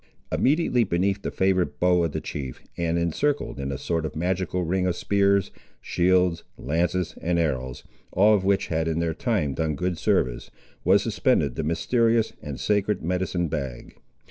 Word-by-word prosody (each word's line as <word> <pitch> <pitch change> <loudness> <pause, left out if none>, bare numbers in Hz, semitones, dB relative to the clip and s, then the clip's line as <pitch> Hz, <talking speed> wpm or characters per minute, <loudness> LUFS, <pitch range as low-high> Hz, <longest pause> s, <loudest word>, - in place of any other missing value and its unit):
Immediately 140 -4 +2
beneath 95 +2 0
the - - -3
favourite 95 -1 0
bow 90 -1 +3
of 80 - 0
the - - -3
chief, 65 -4 -6
and 85 0 0
encircled 85 - -1
in 70 0 -3
a 65 - -3
sort 80 +2 -2
of 80 - -5
magical 90 +2 -1
ring 90 +2 0
of 90 - 0
spears, 100 0 +2 0.3
shields, 90 -1 +2
lances 85 +4 -1
and 85 +1 0
arrows, 65 -6 -2 0.3
all 105 +3 +5
of 100 -3 +2
which 100 0 +1
had 80 0 0
in 80 -1 -1
their 85 -1 0
time 90 - -1
done 80 +2 -1
good 90 +1 -2
service, - - 0 0.3
was - - +4
suspended - - +1
the 80 - -3
mysterious 115 +7 +1
and 70 -3 -6
sacred 105 +3 0
medicine 90 0 -1
bag. 70 -5 -5
90 Hz, 170 wpm, -25 LUFS, 80-95 Hz, 0.3 s, all